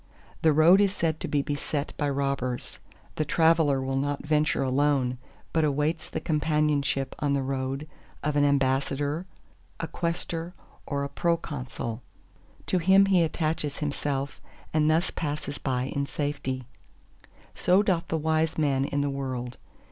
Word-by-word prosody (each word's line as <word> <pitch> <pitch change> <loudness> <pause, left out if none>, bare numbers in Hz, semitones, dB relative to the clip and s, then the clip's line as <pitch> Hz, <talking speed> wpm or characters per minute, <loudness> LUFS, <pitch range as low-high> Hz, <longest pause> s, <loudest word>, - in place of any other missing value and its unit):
The 160 - +5
road 165 +6 +6
is 200 -1 +2
said 160 -4 0
to - - -4
be 145 -1 +1
beset 145 0 -3
by 145 - 0
robbers. 135 -3 -2 0.4
The 155 - +2
traveller 160 -2 +3
will 135 0 -1
not 145 +1 -1
venture 150 -2 +2
alone, 130 -2 +1 0.3
but 160 - +3
awaits 150 +2 0
the - - -3
companionship 150 -3 +1
on 145 -2 +1
the 140 -1 +1
road 135 +2 -3 0.4
of 150 0 0
an 145 - +4
ambassador, 140 +3 +1 0.5
a 165 - -2
quaestor 170 0 -3 0.3
or 140 -1 -1
a - - -1
proconsul. 140 -8 -2 0.6
To 185 - +1
him 190 +3 +6
he 190 -3 +4
attaches 155 -2 -1
himself 140 -2 -2 0.3
and 155 -1 +3
thus 160 +2 +2
passes 145 -2 -4
by 125 -2 -1
in 140 0 0
safety. 140 -3 -3 0.9
So 185 +3 +3
doth 185 -5 +1
the 160 - 0
wise 160 0 +1
man 140 -3 +2
in 145 0 -1
the 140 - 0
world. 130 -3 -4
145 Hz, 150 wpm, -27 LUFS, 135-160 Hz, 0.9 s, road